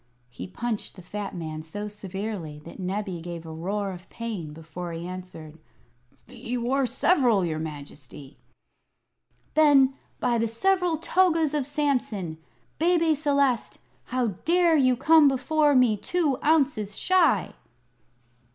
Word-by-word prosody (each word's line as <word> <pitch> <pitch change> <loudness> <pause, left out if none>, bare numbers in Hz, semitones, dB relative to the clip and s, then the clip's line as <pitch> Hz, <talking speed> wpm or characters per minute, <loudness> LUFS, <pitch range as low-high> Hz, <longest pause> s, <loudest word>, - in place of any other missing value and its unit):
He - - -8
punched 225 +3 -4
the 185 - -12
fat 200 +2 -6
man 155 -2 -5
so 205 +7 -6
severely 195 -5 -6
that 170 - -11
Nebbie 190 -1 -3
gave 170 -1 -7
a 160 - -8
roar 195 +5 -3
of 180 0 -11
pain 215 -10 -5
before 165 +3 -8
he 165 +1 -6
answered. 180 -4 -9 0.7
"He 245 0 -5
wore 255 +3 0
several, 245 - +3
your 155 -2 -2
Majesty!" 145 -2 -9 1.1
"Then, 285 -4 +5 0.3
by 240 -2 +1
the 230 - +1
several 355 - +1
togas 330 -2 +2
of 290 -4 -1
Samson, 250 - -1 0.4
Bebe 335 -1 +3
Celeste, 280 -5 +1 0.3
how 250 -2 0
dare 345 -1 +4
you 255 -4 +3
come 310 +3 +6
before 295 +2 +2
me 250 -4 +4
two 295 - 0
ounces 275 -10 +1
shy?" 330 - +2
230 Hz, 130 wpm, -26 LUFS, 180-290 Hz, 1.1 s, come